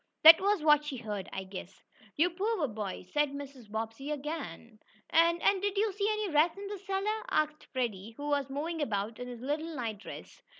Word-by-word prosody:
That 320 +2 +11
was 400 -4 +2
what 300 -1 +6
she 295 -3 -4
heard, 210 -5 -5
I 190 - -4
guess." 190 0 -9 0.3
"You 345 +4 +3
poor 385 -2 0
boy!" 210 -5 -5
said 295 -1 +2
Mrs. 275 -5 -8
Bobbsey 225 +5 -4
again. 275 - -5 0.3
"And 335 +1 +4
and 390 -2 +4
did 405 0 -1
you 420 0 +2
see 405 +2 0
any 425 -2 -1
rats 310 +4 +3
in 400 - -6
the 410 -1 -5
cellar?" 400 +3 -1
asked 305 0 0
Freddie, 225 -4 -3
who 290 - -5
was 285 -2 +1
moving 315 +4 -3
about 220 -3 -2
in 245 - -5
his 245 -2 -8
little 305 +5 -2
night 225 -6 -3
dress. - - -10
295 Hz, 200 wpm, -31 LUFS, 225-345 Hz, 0.3 s, That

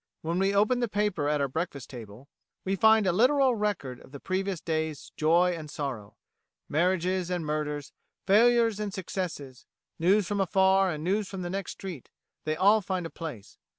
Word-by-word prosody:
When 165 +3 -1
we 195 +1 +2
open 210 +5 +2
the 240 - 0
paper 205 -8 0
at 150 -1 +1
our 140 - +1
breakfast 145 -2 -5
table 115 +1 -10 0.4
we 190 +1 0
find 220 +1 +5
a 185 - +3
literal 260 +7 +4
record 205 - -2
of - - -17
the 140 - -9
previous 190 +1 -2
day's 160 -3 -3
joy 170 +4 +3
and 155 -2 -8
sorrow 130 -9 -5 0.5
marriages 180 +2 0
and 175 -3 -2
murders, 150 -1 -3 0.3
failures 230 +1 +4
and 210 -1 -3
successes, 170 -9 -5 0.3
news 195 +5 +3
from 200 +2 -1
afar 190 +1 +3
and 155 -3 -4
news 200 +3 0
from 190 -2 -5
the 175 - -4
next 195 -1 -4
street 180 -9 -8 0.4
they 155 0 0
all 200 +5 +4
find 185 -2 -3
a 165 - -6
place. 150 -12 -8
180 Hz, 180 wpm, -28 LUFS, 155-200 Hz, 0.5 s, find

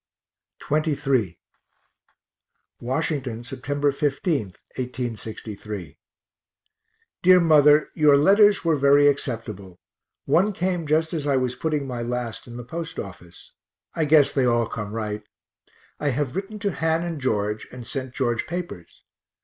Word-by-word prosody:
XXIII 140 - 0 1.4
Washington, 130 -2 -2
Sept. 140 +3 -1
15, 145 +2 0 0.3
1863. 110 - -6 1.2
DEAR 185 0 +7
MOTHER 150 -2 +5
Your 150 -2 +5
letters 200 +6 +5
were 165 -2 +3
very 140 +1 +5
acceptable 110 -9 -3 0.5
one 185 +9 +3
came 180 -3 -2
just 160 +2 +1
as 150 -3 -2
I 140 -2 +3
was 125 -1 0
putting 150 +2 -2
my 125 -3 -4
last 120 -1 -4
in 120 0 -9
the 120 - -6
post 165 +7 -6
office 90 -3 -9 0.4
I 160 - 0
guess 150 -1 +5
they 135 -2 +2
all 120 -1 +2
come 105 -2 -6
right. 105 -1 -3 0.8
I 145 - 0
have 135 -1 -2
written 195 +3 -4
to 205 -1 -1
Han 160 +1 0
and 165 -4 -4
George 105 -4 -1
and 125 -1 -9
sent 130 -1 -5
George 120 -4 -1
papers. 170 - -7
140 Hz, 130 wpm, -24 LUFS, 120-155 Hz, 1.4 s, DEAR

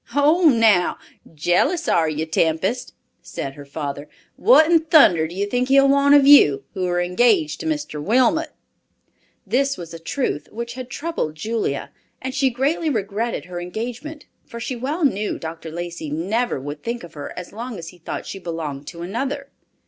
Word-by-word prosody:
"Ho 300 +5 +4
now, 220 -8 +3 0.3
jealous, 175 - +1
are 160 -2 +3
you, 155 +1 -2
Tempest?" 170 +10 -1 0.3
said 135 - -6
her 145 0 -11
father. 145 0 -5 0.3
"What 450 -9 +6
in 330 +1 +4
thunder 295 - +5
do 170 - -10
you 200 +2 0
think 245 +4 -1
he'll 275 +1 +5
want 280 +1 +5
of 285 -1 +6
you, 145 - +7
who 185 -1 -2
are 175 0 0
engaged 180 -3 +2
to - - -4
Mr. 295 - -3
Wilmot?" 260 - +2 1.0
This 275 +2 +1
was 170 -1 -9
a 165 - -8
truth 165 - -3
which 235 +2 -5
had 255 0 -8
troubled 300 - -3
Julia, 215 -4 -3 0.3
and 260 0 -5
she 270 0 +2
greatly 280 +6 0
regretted 220 -1 -2
her 175 -1 -6
engagement, 245 - -6 0.2
for 235 - -9
she 245 +2 -4
well 290 +7 -1
knew 210 -5 0
Dr. 165 0 -7
Lacey 170 -1 -6
never 190 - -1
would 145 +2 -7
think 235 +3 -4
of 175 - -11
her 145 - -7
as 180 -1 -8
long 235 +1 -6
as 165 -1 -7
he 180 - -16
thought 170 - -6
she 195 - -7
belonged 155 -5 -5
to 170 0 -7
another. 275 +9 -3
215 Hz, 180 wpm, -21 LUFS, 165-275 Hz, 1.0 s, you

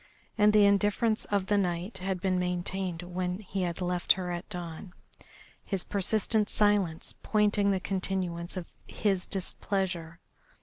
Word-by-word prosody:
And 210 0 +5
the 210 -1 +6
indifference 205 +3 +2
of 200 -2 0
the 205 +1 +2
night 185 +2 -2
had 185 0 -2
been 185 -1 +1
maintained 180 0 -2
when 180 0 -2
he 195 -1 -4
had 175 0 -2
left 180 -1 +3
her 180 -1 -4
at 175 +1 -5
dawn, 175 -1 -7 0.7
his 195 -3 -3
persistent 210 +1 +1
silence 205 -6 +1
pointing 210 -1 +2
the 195 -1 +2
continuance 185 -2 -3
of 180 - -7
his 195 -4 0
displeasure. 180 -3 -3
190 Hz, 140 wpm, -29 LUFS, 180-205 Hz, 0.7 s, the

